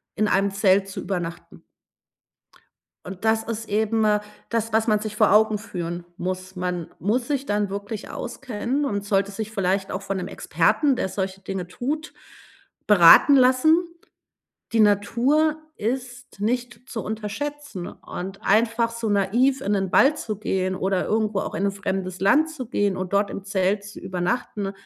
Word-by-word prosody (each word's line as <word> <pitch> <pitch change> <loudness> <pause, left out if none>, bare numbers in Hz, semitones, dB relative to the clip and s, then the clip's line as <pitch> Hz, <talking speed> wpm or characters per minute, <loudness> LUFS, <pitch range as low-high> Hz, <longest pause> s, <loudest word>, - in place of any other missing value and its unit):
in 215 0 +1
einem 200 0 +2
Zelt 195 0 +3
zu 195 - -6
übernachten.“ 175 -2 -5 1.4
Und 190 +3 -8
das 220 0 +3
ist 225 0 -5
eben, 220 +1 +1
äh, 210 -1 +3 0.3
das, 230 -1 -1
was 220 +1 +2
man 215 -2 +2
sich 215 -1 -5
vor - - +4
Augen 215 0 +4
führen 175 -5 -5
muss. 185 +1 -4
Man 180 -2 -3
muss 225 - 0
sich 280 -2 -2
dann 205 0 0
wirklich 200 +2 -6
auskennen 260 +3 -3
und 205 -7 -2
sollte 200 0 +1
sich 215 +2 -5
vielleicht 195 -2 -1
auch 190 - -4
von 195 0 -3
'nem 180 0 -4
Experten, 290 -3 +1
der 245 - -2
solche 190 0 -4
Dinge 190 -1 -5
tut, 290 - -4 0.7
beraten 205 - +8
lassen. 260 +7 +4 0.9
Die 225 - +3
Natur 235 +10 +3 0.2
ist 245 0 -5
nicht 245 +3 -3
zu 225 - -4
unterschätzen, 220 0 -5
und 190 +2 -8
einfach 230 +2 +2
so 230 -1 -4
naiv 230 +7 +2
in 200 - -1
den 195 -2 0
Wald 295 +3 +5
zu 215 -7 -4
gehen 185 -2 -1
oder 190 0 0
irgendwo 215 -2 0
auch - - -5
in 200 - 0
'n - - +2
fremdes 190 -2 -3
Land 300 +12 +4
zu 280 -6 -7
gehen 205 -4 0
und 185 0 -4
dort 200 0 +2
im 195 - -6
Zelt 200 0 0
zu 205 - -10
übernachten 195 +2 -2
210 Hz, 165 wpm, -24 LUFS, 195-235 Hz, 1.4 s, beraten